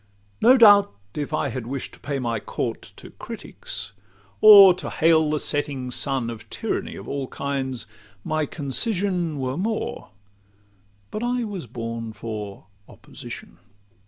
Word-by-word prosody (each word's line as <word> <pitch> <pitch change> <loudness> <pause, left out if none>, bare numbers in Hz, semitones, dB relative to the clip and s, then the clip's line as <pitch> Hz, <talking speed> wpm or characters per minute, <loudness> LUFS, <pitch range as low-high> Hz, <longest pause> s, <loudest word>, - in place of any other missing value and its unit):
No 250 +4 +7
doubt, 205 - +7 0.2
if 145 -2 -4
I - - 0
had 125 -3 -5
wish' 135 +1 -5
to - - -14
pay 140 -1 -3
my 120 -4 -2
court - - -4
To - - -12
critics, 95 +2 -7 0.5
or 200 -3 +10
to 180 - -6
hail 160 -1 +3
the 150 - +1
setting 140 -4 -2
sun 130 -2 0
Of 115 - -11
tyranny - - -3
of 100 - -10
all 140 -2 -3
kinds, 130 -4 -3 0.4
my 155 -1 -1
concision 175 - -1
Were 130 +1 -3
more;—but 100 - -7
I 245 0 0
was 195 - -6
born 115 -1 -5
for 105 -4 -7 0.2
opposition. 80 - -11
135 Hz, 135 wpm, -23 LUFS, 110-175 Hz, 0.5 s, or